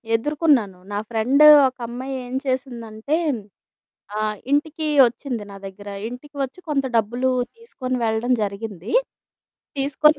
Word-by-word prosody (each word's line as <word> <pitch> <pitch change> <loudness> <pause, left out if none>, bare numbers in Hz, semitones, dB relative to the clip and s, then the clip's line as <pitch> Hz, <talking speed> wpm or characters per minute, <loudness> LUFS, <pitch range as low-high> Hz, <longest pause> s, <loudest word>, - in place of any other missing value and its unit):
ఎదుర్కొన్నాను. 265 - +2
నా 205 - -2
ఫ్రెండు 245 +6 +4 0.2
ఒక 260 - -6
అమ్మాయి 255 +3 -5
ఏం 245 +1 -6
చేసిందంటే, 250 0 -2 1.0
ఆహ్, 215 0 -1 0.2
ఇంటికి 310 +2 0 0.2
వచ్చింది 240 -1 -4
నా - - -9
దగ్గర. 205 +1 -10 0.2
ఇంటికి 285 +5 -11
వచ్చి 270 +7 -5
కొంత 275 -2 +1
డబ్బులు 240 +4 +1 0.3
తీసుకొని 260 - -4
వెళ్ళడం 225 +3 +1
జరిగింది. 200 - -4 0.9
తీసుకొని 290 +2 +3
250 Hz, 120 wpm, -22 LUFS, 220-285 Hz, 1.0 s, ఫ్రెండు